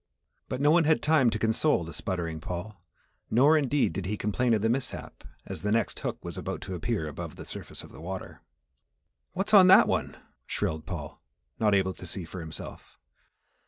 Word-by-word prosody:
But 125 - -3
no 145 +1 +5
one 170 0 +5
had 160 0 +3
time 150 -6 +4
to 110 - -1
console 110 - +2
the 85 0 -8
sputtering 85 -1 -3
Paul, 90 +5 -6 0.5
nor 140 +7 +5
indeed, 145 - +2
did 95 0 -4
he 105 +2 -2
complain 115 +4 +1
of 105 - -1
the - - +3
mishap, 125 +3 -3 0.2
as - - -6
the 105 - -1
next 115 +1 0
hook - - -3
was - - -5
about - - -4
to 95 0 -6
appear 80 -2 -2
above 75 - -7
the - - -9
surface - - -7
of - - -13
the - - -12
water. 95 +3 -7 0.9
"What's 195 +3 -2
on 190 -3 +9
that 190 - +8
one?" - - -1 0.3
shrilled 80 0 -2
Paul, 75 -5 -6 0.4
not 105 -2 +3
able 95 -1 +1
to 90 - -10
see 85 +1 -4
for 90 +3 -8
himself. 80 -2 -9
105 Hz, 195 wpm, -28 LUFS, 90-135 Hz, 0.9 s, on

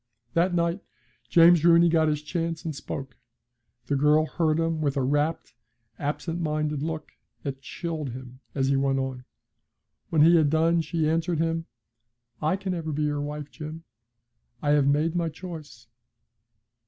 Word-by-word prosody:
That 175 +1 +2
night 170 +2 0 0.5
James 170 +2 +6
Rooney 170 0 +6
got 160 -1 +3
his 150 -1 -1
chance 165 0 -3
and 160 -3 -3
spoke. 135 -1 -6 0.7
The 145 - 0
girl 150 +2 +4
heard 160 -1 0
him 165 -1 0
with 140 -2 0
a 135 - +1
rapt, 145 +4 0 0.5
absent 165 +4 -3
minded 150 -2 -1
look 155 0 -4 0.3
that 135 -2 -5
chilled 155 0 -4
him 130 +1 -9 0.2
as 135 -1 +1
he 140 - +3
went 135 0 +1
on. 130 -1 -3 0.8
When 155 -2 +4
he 170 +2 +7
had 155 -3 +4
done 165 +2 +3
she 160 0 -1
answered 165 +1 0
him: 165 +1 -1 0.7
'I 155 +5 +2
can 190 -1 -4
never 165 -3 -3
be 150 +1 -1
your 145 -1 0
wife, 150 0 -5
Jim. 155 +1 -8 0.8
I 145 - 0
have 145 -2 +4
made 155 +4 +2
my 170 -1 0
choice.' 155 -8 -9
155 Hz, 160 wpm, -26 LUFS, 145-165 Hz, 0.8 s, he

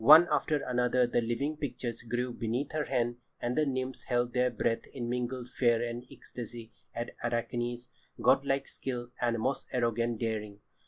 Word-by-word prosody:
One 155 +7 +10
after 150 -2 +2
another 125 0 +3
the 120 0 +1
living 120 +7 -1
pictures 125 -5 -3
grew 120 +1 -2
beneath 120 +5 -2
her 155 -1 0
hand, 120 -2 0 0.2
and 120 +1 -1
the 155 -1 +3
nymphs 130 -1 -2
held 120 -1 +1
their 125 0 +3
breath 115 -2 0
in 120 -3 -5
mingled 125 0 -2
fear 120 -3 +3
and 120 +1 -5
ecstasy 115 -1 -8 0.2
at 120 0 -3
Arachne's 120 +1 -1 0.3
godlike 135 0 +3
skill 120 -2 -4
and 120 -1 +2
most 130 +5 -1
arrogant 120 -2 +1
daring. 105 -3 -2
120 Hz, 160 wpm, -31 LUFS, 120-130 Hz, 0.3 s, One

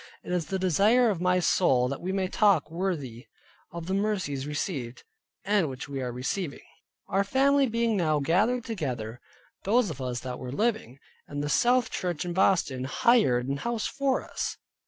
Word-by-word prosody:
It - - -7
is 175 -3 -1
the 195 - -1
desire 210 +7 +3
of 180 -4 -4
my 180 0 +3
soul 135 -8 +3
that 135 +1 -4
we 185 - -2
may 190 -1 0
walk 180 -8 +4
worthy 160 -10 -3 0.4
of 170 -1 -6
the 190 - -2
mercies 190 -10 -1
received, 140 -5 -4 0.4
and 200 -6 +2
which 130 +1 -7
we 140 -1 -4
are 125 -1 -3
receiving. 140 +6 -4 0.4
Our 195 - +1
family 275 +5 +3
being 230 -1 0
now 155 -4 +2
gathered 210 - +1
together 125 - -4 0.4
(those 215 -1 +2
of 140 - -8
us 125 -2 -3
that 125 -1 -6
were 125 -1 -6
living), 215 - -1 0.3
the 145 0 -3
South 245 - +3
Church 175 -4 -3
in 175 - -3
Boston 170 -9 +2
hired 130 - +3
an 140 +1 -1
house 235 +6 -2
for 275 -1 -1
us. - - -4
180 Hz, 175 wpm, -27 LUFS, 135-210 Hz, 0.4 s, walk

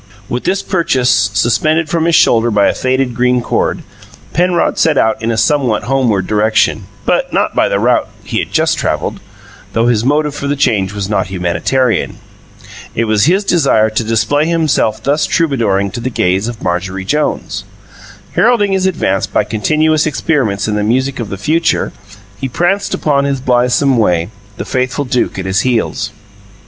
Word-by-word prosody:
With 120 +4 -4
this 195 +1 0
purchase 135 -9 +1 0.2
suspended 155 +9 +1
from 165 +1 0
his 170 -1 +3
shoulder 115 0 +4
by 105 -2 +2
a - - +2
faded 130 -1 -1
green 125 +1 +2
cord, 120 - -1 0.5
Penrod 175 +1 +1
set 155 -3 +2
out 110 -3 +1
in 115 - -2
a 115 - -1
somewhat 125 -2 +1
homeward 120 -6 0
direction, 110 -1 +1 0.2
but - - 0
not - - 0
by - - +2
the - - +1
route 120 +3 +1
he - - -2
had - - -4
just - - +1
travelled, - - -2 0.5
though 115 +1 +1
his 115 -2 +2
motive 150 +3 +1
for 140 - -4
the 145 - 0
change 105 -9 +1
was 100 -2 -4
not 105 -3 -1
humanitarian. 95 +7 -1 0.8
It 115 - 0
was 110 0 +2
his 190 +6 +2
desire 110 - +2
to 110 +2 -1
display 130 +7 +1
himself 155 -10 0
thus 145 +1 +1
troubadouring 115 - 0
to - - -5
the 125 +2 -3
gaze 95 -2 0
of 120 -2 -7
Marjorie 95 +2 -2
Jones. 150 +8 -2 0.7
Heralding 215 -5 +3
his 190 -1 +1
advance 100 - 0
by 100 - 0
continuous 155 +9 +1
experiments 130 -10 0
in 105 - -1
the 105 - 0
music 130 +5 0
of 115 - -4
the 100 - -5
future, 165 - 0 0.5
he 135 - -3
pranced 195 +9 0
upon 140 -2 +1
his 140 -1 -1
blithesome 125 +1 +2
way, 90 -2 +1 0.3
the - - -5
faithful 130 +2 -1
Duke 125 -4 -1
at 95 - -4
his 95 +1 +1
heels. 120 -2 -1
125 Hz, 175 wpm, -14 LUFS, 110-150 Hz, 0.8 s, shoulder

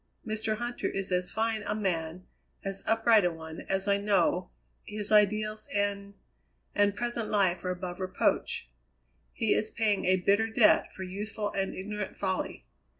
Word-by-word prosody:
Mr. 220 0 -1
Huntter 240 +1 -3
is 195 -1 -3
as 180 0 +1
fine 225 -1 0
a 210 - -2
man, 180 -3 -2 0.4
as 195 0 0
upright 225 -1 +5
a 180 - +3
one, 160 0 -8
as 195 +1 0
I 200 0 +3
know, 185 -3 +2 0.3
his 210 0 -2
ideals 215 +1 +3
and 200 -1 -1 0.6
and 205 0 +3
present 240 -1 -2
life 190 -4 +2
are 180 - -2
above 180 0 -4
reproach. 185 - 0 0.6
He - - +1
is 215 - +1
paying 215 -3 +1
a 185 - +4
bitter 200 +4 +2
debt 220 -1 +4
for 190 - -7
youthful 205 +2 -4
and 195 -1 -2
ignorant 210 +1 -5
folly. 190 -2 -2
200 Hz, 155 wpm, -29 LUFS, 185-215 Hz, 0.6 s, upright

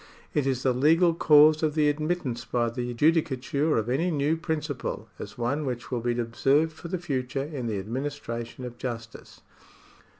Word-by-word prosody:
It 145 -3 +1
is 130 -1 -1
the 130 - +3
legal 165 +7 +4
cause 155 -1 +6
of 155 -2 0
the 150 -2 +3
admittance 145 -5 -1
by 120 -1 0
the 125 +1 -3
judicature 150 0 +1
of 110 0 -1
any 140 +9 +1
new 150 0 +1
principle 155 -5 -3
as - - -8
one 130 +6 -1
which 125 -4 -4
will 120 -2 -1
be 120 0 -1
observed 135 +7 +2
for 160 - -9
the 185 +2 -2
future 135 -5 -2
in 140 -5 -5
the 110 -3 -2
administration 120 +2 -5
of 120 -1 -9
justice. 115 -3 -7
135 Hz, 170 wpm, -27 LUFS, 120-155 Hz, -, cause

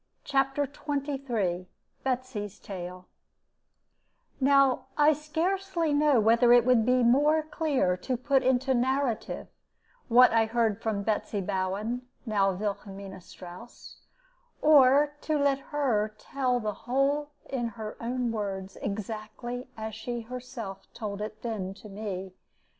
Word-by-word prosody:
CHAPTER 275 0 +1
XXIII 270 - -2 0.4
BETSY'S 250 -6 -3
TALE 180 -1 -8 1.3
Now 275 -1 +4
I 300 +1 +6
scarcely 330 +2 -1
know 290 -3 +4
whether 230 +3 +5
it 240 -1 +7
would 250 -3 +4
be 250 0 +4
more 295 +6 +4
clear 295 - 0
to 250 +7 -2
put 270 +2 +2
into 260 +1 +2
narrative 260 -1 0 0.6
what 250 +1 +7
I 225 -1 +4
heard 225 -2 +1
from 215 -3 -1
Betsy 210 0 -1
Bowen, 200 +6 -2 0.2
now 200 -4 +2
Wilhelmina 195 -1 -5
Strouss, 180 +7 -12 0.6
or 290 0 +6
to 310 -1 0
let 280 -1 +2
her 225 -8 0
tell 255 0 -1
the 215 -2 -2
whole 275 +6 0 0.2
in 245 -3 -2
her 220 -1 -7
own 245 0 -1
words, 195 -3 -4
exactly 220 +4 -5
as 220 0 -5
she 235 +2 -4
herself 230 -5 -8
told 210 -3 -5
it 215 0 -6
then 200 -5 -3
to 200 +2 -12
me. 195 -2 -5
240 Hz, 125 wpm, -28 LUFS, 210-275 Hz, 1.3 s, it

